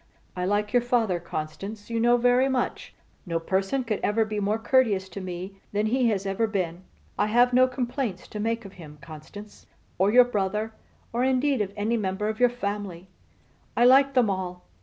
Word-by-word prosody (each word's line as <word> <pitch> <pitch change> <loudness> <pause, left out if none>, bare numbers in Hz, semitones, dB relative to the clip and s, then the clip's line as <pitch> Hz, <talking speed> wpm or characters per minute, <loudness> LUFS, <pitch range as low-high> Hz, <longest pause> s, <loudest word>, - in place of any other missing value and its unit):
I 180 0 -2
like 205 +3 0
your 245 - +5
father, 230 -7 +1
Constance, 185 +7 -6
you 230 - 0
know, 240 +1 +4
very 245 +2 +3
much. 255 -2 -2 0.3
No 165 -1 -1
person 195 +9 -1 0.2
ever 220 +2 +2
could 215 - -7
be 210 -1 -2
more 205 +2 0
courteous 225 -5 +2
to 195 +2 -7
me 185 +2 -7
than 210 +1 +1
he 245 +2 +2
has 200 -3 -1
ever 195 +4 0
been. 185 -5 -2 0.4
I - - +3
have 245 +3 +4
no 255 +1 +6
complaints 250 -5 -3
to 210 - -6
make 230 +1 -1
of 195 - -10
him, 150 -2 -11
Constance; 155 +9 -12 0.3
or 195 +2 +3
your 250 +2 +7
brother, 210 -1 -2 0.4
or 240 +2 +1
indeed 265 0 +2
of 200 -2 -2
any 220 +3 0
member 205 0 -2
of 220 - -4
your 245 0 +5
family. 200 -6 -5 0.7
I 240 - +5
like 270 +2 +6
them 250 -3 +4
all. 185 -2 -4
210 Hz, 190 wpm, -26 LUFS, 190-245 Hz, 0.7 s, your